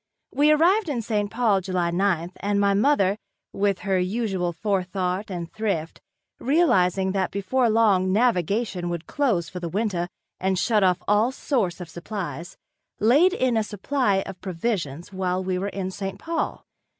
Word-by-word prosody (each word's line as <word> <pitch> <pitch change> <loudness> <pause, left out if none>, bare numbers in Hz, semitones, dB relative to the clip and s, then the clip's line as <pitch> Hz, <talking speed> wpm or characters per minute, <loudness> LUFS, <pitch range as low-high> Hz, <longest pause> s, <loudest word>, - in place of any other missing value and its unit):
We 295 +1 +3
arrived 350 +5 +3
in 245 -5 -2
St. 210 -2 -1
Paul 220 -4 +2
July 180 -2 -1
ninth 175 -2 0
and 200 0 0
my 200 0 +3
mother, 205 -3 +2 0.3
with 200 -1 0
her 195 -2 +1
usual 190 -2 -1
forethought 185 +1 -2
and 175 -3 -6
thrift, 200 -8 -3 0.4
(realizing 195 - +2
that 190 -1 0
before 230 +6 0
long 205 -4 +3
navigation 200 -3 +1
would 170 -1 -4
close 225 - 0
for 180 - -7
the 170 -1 -4
winter 190 -2 -1 0.3
and 190 0 0
shut 210 +2 +2
off 180 -1 +2
all 210 +4 +3
source 225 - -1
of 180 - -7
supplies) 175 +1 -6 0.4
laid 290 - +5
in 255 -10 +1
a 220 - +2
supply 205 -1 0
of 190 -2 -9
provisions 175 -3 -3
while 185 0 -1
we 185 -1 -1
were 200 +2 -2
in 190 -2 -4
St. 195 0 -5
Paul. 330 0 -3
195 Hz, 160 wpm, -24 LUFS, 180-225 Hz, 0.4 s, laid